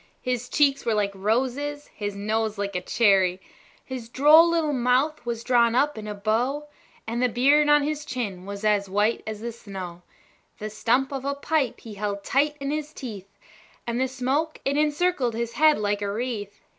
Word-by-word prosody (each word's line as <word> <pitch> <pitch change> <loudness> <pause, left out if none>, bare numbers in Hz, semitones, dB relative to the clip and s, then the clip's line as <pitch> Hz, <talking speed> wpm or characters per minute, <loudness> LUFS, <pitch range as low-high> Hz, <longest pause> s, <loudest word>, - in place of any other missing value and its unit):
His 250 -1 -2
cheeks 280 -2 +2
were 225 - +1
like 205 -1 +1
roses, 260 +8 -1
his 205 -1 -4
nose 215 +1 -1
like 200 -1 -3
a 180 - -1
cherry; 190 -3 +3 0.5
His 250 -3 -7
droll 305 +6 +6
little 325 -3 +1
mouth 255 +4 +1
was 230 -1 -3
drawn 235 -2 +3
up 295 +3 +2
like 215 -1 -7
a 210 - -4
bow, 245 +8 -1 0.4
And 230 +2 -2
the 250 - +3
beard 285 +6 +4
on 295 -1 +5
his 300 0 -2
chin 215 -10 -5
was 200 +1 -6
as 205 -2 +2
white 210 +4 +1
as 215 -1 -5
the 235 +1 -4
snow; 190 -6 -8 0.6
The 215 0 -6
stump 245 +5 +1
of 270 -1 -4
a 280 +1 -1
pipe 285 -3 -1
he 225 - -9
held 200 0 -3
tight 290 +6 +1
in 275 0 -3
his 305 0 -4
teeth, 205 -9 -8 0.6
And 235 +1 -1
the 260 - +2
smoke, 270 +5 -1
it 275 - +1
encircled 300 -4 +1
his 235 0 -3
head 310 0 +5
like 205 -1 -1
a 200 -1 -1
wreath. 215 -2 -4
240 Hz, 190 wpm, -25 LUFS, 210-285 Hz, 0.6 s, droll